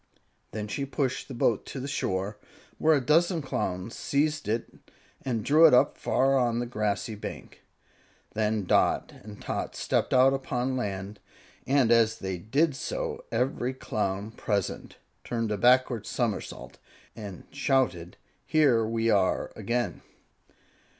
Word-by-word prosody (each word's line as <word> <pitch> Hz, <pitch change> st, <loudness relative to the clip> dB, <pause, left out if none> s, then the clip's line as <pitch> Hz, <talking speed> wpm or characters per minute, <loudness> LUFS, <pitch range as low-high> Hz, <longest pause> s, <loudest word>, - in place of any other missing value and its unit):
Then 105 Hz, 0 st, -5 dB
she 140 Hz, +7 st, -3 dB
pushed 135 Hz, -1 st, -2 dB
the 135 Hz, -, -7 dB
boat 115 Hz, -2 st, +1 dB
to 135 Hz, -, -6 dB
the 130 Hz, -, -4 dB
shore, 100 Hz, -6 st, -2 dB, 0.4 s
where 160 Hz, 0 st, +5 dB
a -, -, +3 dB
dozen 170 Hz, +5 st, +3 dB
Clowns 95 Hz, -5 st, -3 dB
seized 150 Hz, +2 st, 0 dB
it 115 Hz, +2 st, -3 dB, 0.4 s
and 115 Hz, -5 st, -2 dB
drew 155 Hz, +3 st, +7 dB
it 125 Hz, -5 st, +4 dB
far 135 Hz, +1 st, +2 dB
up -, -, +3 dB
on 120 Hz, -1 st, 0 dB
the 120 Hz, -, -1 dB
grassy 110 Hz, -1 st, -2 dB
bank. 105 Hz, -, -8 dB, 0.7 s
Then 110 Hz, -1 st, 0 dB
Dot -, -, +2 dB
and 105 Hz, 0 st, -11 dB
Tot -, -, -4 dB
stepped -, -, 0 dB
out 130 Hz, +1 st, +5 dB
upon 130 Hz, -1 st, -2 dB
land, 100 Hz, -3 st, -4 dB, 0.5 s
and 135 Hz, -3 st, +3 dB
as 115 Hz, -2 st, +4 dB
they 95 Hz, -2 st, -4 dB
did 140 Hz, -, +1 dB
so -, -, -4 dB
every 130 Hz, 0 st, -1 dB
Clown 100 Hz, -3 st, -3 dB
present 100 Hz, -4 st, -3 dB, 0.3 s
turned 115 Hz, -2 st, -2 dB
a 105 Hz, -, 0 dB
backward 125 Hz, -2 st, +3 dB
somersault 115 Hz, -4 st, -3 dB, 0.4 s
and 100 Hz, -5 st, -8 dB
shouted, 130 Hz, -11 st, 0 dB, 0.3 s
"Here 140 Hz, -8 st, +4 dB
we 115 Hz, +1 st, 0 dB
are 100 Hz, -3 st, +1 dB
again!" 120 Hz, 0 st, -2 dB
120 Hz, 140 wpm, -28 LUFS, 105-135 Hz, 0.7 s, drew